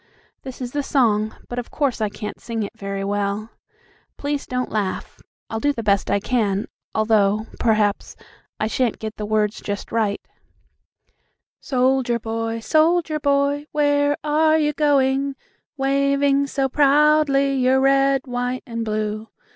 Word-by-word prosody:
This 260 -1 -9
is 245 -1 -4
the 290 - -1
song, 220 -6 +1
but 245 - -4
of 245 - -7
course 275 -6 -1
I 215 - +1
can't 210 0 -7
sing 225 -2 -3
it 200 - -7
very 195 0 -4
well. 205 +2 -2 0.7
Please 285 0 -3
don't 250 0 -2
laugh. 205 -3 -3 0.3
I'll 225 - -4
do 290 +5 +2
the 235 -5 -5
best 200 -2 +1
I 200 - +2
can, 210 -3 0 0.3
although, 215 -1 +2
perhaps, 215 -3 +1 0.4
I - - 0
shan't 235 +1 0
get 220 0 -6
the 210 - -4
words 215 0 0
just 205 0 -5
right: 215 -3 0 1.4
"'Soldier 255 -2 +1
boy, 225 0 -3
soldier 315 +3 +2
boy, 285 +1 +1
where 290 -1 +2
are 310 +1 +3
you 300 -1 +1
going, 275 -2 +2 0.4
Waving 280 +1 +2
so 270 -1 0
proudly 285 0 +3
your 260 0 +3
red, 275 0 +3
white 245 0 -3
and 230 -1 -4
blue?' 215 0 -3
250 Hz, 145 wpm, -22 LUFS, 215-280 Hz, 1.4 s, are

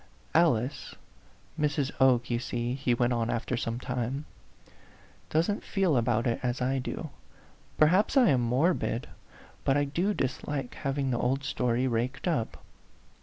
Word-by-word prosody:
" - - -31
Alice 125 0 -2 0.6
Mrs. 145 -2 0
Oke 125 -3 +4
you 120 - +1
see," 120 -1 -2
he 130 -2 0
went 120 +1 +1
on 115 -1 0
af 120 - -1
ter 125 - -1
some 115 0 -2
time, 125 +3 -3 0.5
" - - -27
doesn't 170 +7 +1
feel 190 -7 +1
about 120 -1 +1
it 120 -2 0
as 125 0 -1
I 130 +1 0
do. 150 +4 -5 0.7
Perhaps 185 - +4
I 250 -6 +6
am 130 -3 +3
morbid. 125 0 +1 0.6
But 135 - +2
I 145 - +3
do 175 +9 0
dislike 135 0 -3
hav 140 -2 -3
ing 135 -2 0
the 120 - 0
old 135 +3 0
story 125 -2 0
raked 125 +5 -1
up." 145 -10 -2
130 Hz, 165 wpm, -29 LUFS, 120-145 Hz, 0.7 s, I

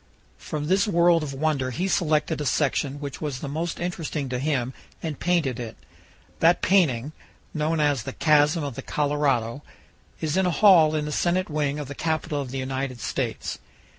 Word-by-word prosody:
From 150 -1 -4
this 190 +6 +2
world 170 -3 +4
of 150 -2 -4
wonder 140 -2 0
he 175 +9 -2
selected 155 -5 +1
a - - -2
section 145 -1 0
which 140 -2 -6
was 145 -4 -3
the 140 - -6
most 160 +4 -3
interesting 165 -5 -3
to 125 0 -2
him 130 -3 -1 0.3
and 155 -4 -4
painted 165 -9 +1
it. 115 -2 -6 0.6
That 170 +2 +4
painting, 150 -9 +3 0.4
known 155 +1 0
as 145 -4 +2
"The 135 +2 -6
Chasm 150 +1 +3
of 140 -2 -3
the - - -6
Colorado," 140 -4 0 0.6
is 160 +1 -1
in 190 -1 +3
a - - +3
hall 170 -5 +6
in 150 -1 -1
the 150 - -4
Senate 175 +3 0
wing 150 -1 0
of 145 -2 -5
the 145 - -6
Capitol 155 -1 -2
of 135 - -6
the 135 - -5
United 130 -1 -3
States. - - -3
150 Hz, 185 wpm, -25 LUFS, 135-165 Hz, 0.6 s, hall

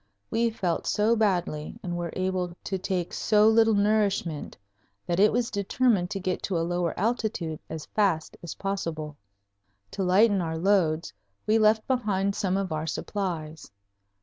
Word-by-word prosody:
We 230 +1 +2
felt 185 -6 -2
so 215 +3 +2
badly 175 -8 -1
and 175 -1 -3
were 175 -1 -3
able 185 -2 -2
to 190 - -2
take 180 -2 -2
so 210 0 +3
little 225 0 +5
nourishment 200 -6 0 0.5
that 175 +1 -1
it 210 +2 +6
was 240 0 0
determined 200 -2 +1
to 195 -1 -3
get 185 -1 -2
to 185 - 0
a 165 - 0
lower 175 -1 -1
altitude 210 -7 -1
as 160 -1 -6
fast 190 -7 0
as 170 - -7
possible. 165 -6 -4 0.8
To 195 - -2
lighten 195 +2 +4
our 160 -1 -3
loads 170 -3 +1 0.3
we 220 +1 +3
left 215 0 +3
behind 200 -6 0
some 195 -2 0
of 195 -3 -2
our 155 +1 -2
supplies. 160 -3 -4
190 Hz, 155 wpm, -27 LUFS, 170-210 Hz, 0.8 s, it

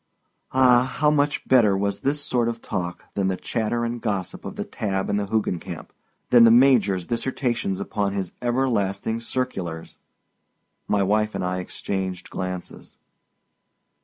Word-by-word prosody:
Ah, 130 -1 +4
how 150 0 +4
much 145 -1 0
better 110 -7 +5
was 100 0 -1
this 145 +2 0
sort 120 -4 0
of 115 0 -4
talk 90 -5 -4
than 100 -2 0
the 95 -1 -1
chatter 120 +2 -1
and 120 0 -4
gossip 100 -6 -3
of - - -6
the - - -4
Tabb 95 -2 -2
and 100 - +1
the 100 - -2
Hoogencamp—than 110 +3 0
the 115 - +8
Major's 115 -7 +4
dissertations 120 -4 -1
upon 100 0 -2
his 95 -3 -3
everlasting 115 -4 0
circulars! 95 -10 -4 0.9
My 100 -1 +2
wife 105 +2 +1
and - - -2
I 90 0 -1
exchanged 95 0 -4
glances. 90 -1 -6
105 Hz, 140 wpm, -24 LUFS, 95-120 Hz, 0.9 s, the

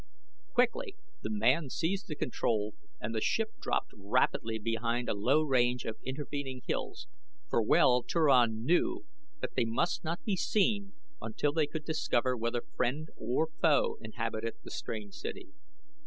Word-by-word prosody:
Quickly 390 - +2 0.3
the - - -3
man 170 -8 +2
seized 185 +8 -1
the 155 - -4
control 110 -6 0 0.3
and 110 +2 -3
the 110 - -1
ship 225 - +1
dropped - - -1
rapidly 110 +2 +1
behind 115 +2 -1
a - - +1
low 125 +10 +3
range 125 -3 +2
of 110 - -3
intervening 135 -1 -4
hills, 405 +1 -3 0.5
for - - +3
well 125 +3 +5
Turan 120 -8 +3
knew 345 - +2 0.4
that - - -3
they - - +3
must 115 +10 0
not 170 +1 -3
be 205 - +1
seen 200 +1 +1 0.3
until 110 +6 0
they 155 -2 +2
could 155 0 -5
discover 130 -5 +1
whether 115 0 -1
friend 140 +6 0
or 125 +8 0
foe 155 -4 +3
inhabited 115 0 -3
the - - -9
strange 105 -3 -5
city. 375 -4 -6
130 Hz, 150 wpm, -32 LUFS, 115-170 Hz, 0.5 s, well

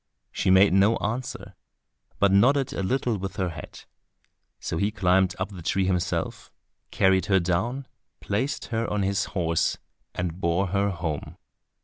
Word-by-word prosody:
She - - -1
made 95 +1 +6
no 100 +4 +4
answer, 120 +4 -4 0.6
but 100 -1 +3
nodded 130 +7 +3
a - - -3
little 120 +1 0
with 95 +1 -5
her 95 -3 -1
head. 80 - -10 0.8
So - - -3
he 100 +5 +1
climbed 95 -3 +2
up 95 +2 -3
the 95 -4 -9
tree 95 +3 0
himself, 90 -2 -2 0.4
carried 95 0 +2
her 95 -2 +4
down, 110 +10 -1 0.3
placed 130 +8 -2
her 115 +1 0
on 105 -1 0
his 100 0 0
horse, 85 -2 +1 0.4
and 90 0 -3
bore 90 +2 +1
her 100 +1 +1
home. 85 -5 -4
95 Hz, 150 wpm, -25 LUFS, 90-105 Hz, 0.8 s, made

